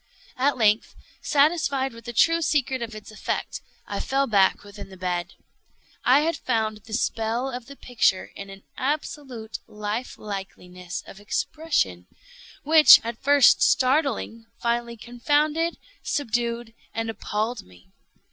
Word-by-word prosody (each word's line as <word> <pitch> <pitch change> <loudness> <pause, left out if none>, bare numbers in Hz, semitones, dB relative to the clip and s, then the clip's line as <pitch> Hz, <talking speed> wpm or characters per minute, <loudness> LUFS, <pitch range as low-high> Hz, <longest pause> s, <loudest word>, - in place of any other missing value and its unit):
At 280 +2 +2
length, 215 -1 +2 0.3
satisfied 280 -3 +2
with 230 0 -13
the 240 - -5
true 330 +7 +3
secret 265 -5 0
of 230 -1 -5
its 215 0 -10
effect, 215 - -4 0.2
I - - -4
fell 275 +1 0
back 200 -6 +3
within 205 -1 -11
the 190 - -12
bed. 175 -1 -3 0.7
I 260 +4 +5
had 330 +2 0
found 220 -3 -1
the 215 +1 -13
spell 230 +3 -1
of 245 -1 -7
the 280 - -11
picture 235 -8 0
in 200 0 -8
an 195 0 -12
absolute 265 -5 -4
life 210 +4 -5
likeliness 180 -3 -7
of 195 - -12
expression, 205 - -2 0.6
which, 310 +1 +9
at 230 0 -6
first 285 -1 +5
startling, 255 -4 +1
finally 235 0 -1
confounded, 295 +8 0 0.2
subdued, 235 -3 -2 0.2
and 225 0 -2
appalled 220 +1 -3
me. 90 0 -20
235 Hz, 135 wpm, -24 LUFS, 210-275 Hz, 0.7 s, which